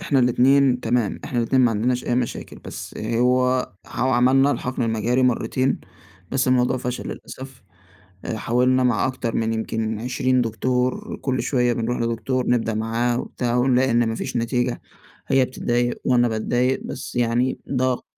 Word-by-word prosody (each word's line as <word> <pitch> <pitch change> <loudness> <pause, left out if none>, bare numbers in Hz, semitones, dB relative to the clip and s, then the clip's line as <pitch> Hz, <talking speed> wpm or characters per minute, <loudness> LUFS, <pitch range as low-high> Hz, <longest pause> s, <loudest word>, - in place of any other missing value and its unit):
إحنا 150 -7 +1
الاتنين 130 +1 +4
تمام، 115 -2 0
إحنا 125 - -3
الاتنين 125 +2 +2
ما 120 - +4
عندناش 120 +3 0
أي 120 - +1
مشاكل، 120 -1 -3
بس - - -8
هو 125 +3 +1
ح - - -6
وعملنا 130 +2 +4
الحقْن 125 -3 -2
المجهري 115 +3 +1
مرّتين، 125 +1 +1 0.5
بس 130 -1 +1
الموضوع 125 0 +2
فشَل 125 0 -4
للأسف. 130 -3 -9 0.6
آآ، 110 - -3
حاولنا 125 +3 +2
مع 125 -3 +2
أكتر 130 -3 -3
من 115 0 0
يمْكِن 110 -1 -2
20 130 +2 +1
دكتور، 125 +2 -1
كلّ 130 -2 -1
شوية 125 -3 +1
بنرُوح 120 +1 -2
لدكتور 115 +2 -1
نبدأ 115 -2 +1
معاه 115 +2 0
وبتاع 120 -2 -2
ونلاقي 130 +1 +3
إن 115 -1 +2
مفيش 120 +2 -3
نتيجة. 120 +1 -1 0.5
هي 135 -1 +3
بتتضايق 120 -1 -1
وأنا 120 -1 +3
باتضايق 120 +3 0
بس 125 - -7
يعني 120 +2 +1
ده 130 -1 +1
ق - - -13
125 Hz, 155 wpm, -22 LUFS, 115-130 Hz, 0.6 s, الاتنين